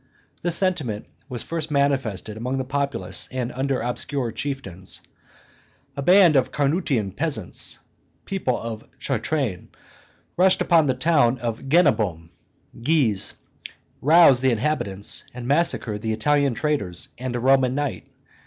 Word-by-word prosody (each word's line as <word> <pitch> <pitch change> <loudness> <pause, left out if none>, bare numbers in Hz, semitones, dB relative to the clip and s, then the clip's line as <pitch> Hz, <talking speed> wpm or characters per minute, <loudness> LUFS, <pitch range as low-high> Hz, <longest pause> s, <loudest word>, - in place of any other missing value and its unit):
This 175 -1 +2
sentiment 150 - 0 0.2
was 125 -2 -4
first 160 -2 -4
manifested 135 -8 0
amongst 125 +4 -3
the 130 - -1
populace 140 +1 -2
and 125 -1 -3
under 135 +1 -1
obscure 125 +1 -2
chieftains; 110 -8 -5 0.9
a 140 - -3
band 180 0 +6
of 130 -2 +2
Carnutian 140 - 0
peasants 140 - 0 0.5
(people 185 -11 -1
of 115 -1 -6
Chartrain) 135 - -2 0.7
rushed 185 +1 +4
upon 165 -4 +3
the 130 - +1
town 130 -3 +3
of 120 +2 -5
Genabum 110 - +2 0.5
(Gies), 125 -8 +1 0.7
roused 150 -4 +6
the 130 - +3
inhabitants, 105 -6 0
and 125 -1 -6
massacred 135 -8 +1
the 110 0 -1
Italian 140 +3 +1
traders 120 - -2
and 125 -1 -4
a - - -1
Roman 130 0 +3
knight, 145 -3 -3
C. - - -34
130 Hz, 130 wpm, -23 LUFS, 115-150 Hz, 0.9 s, band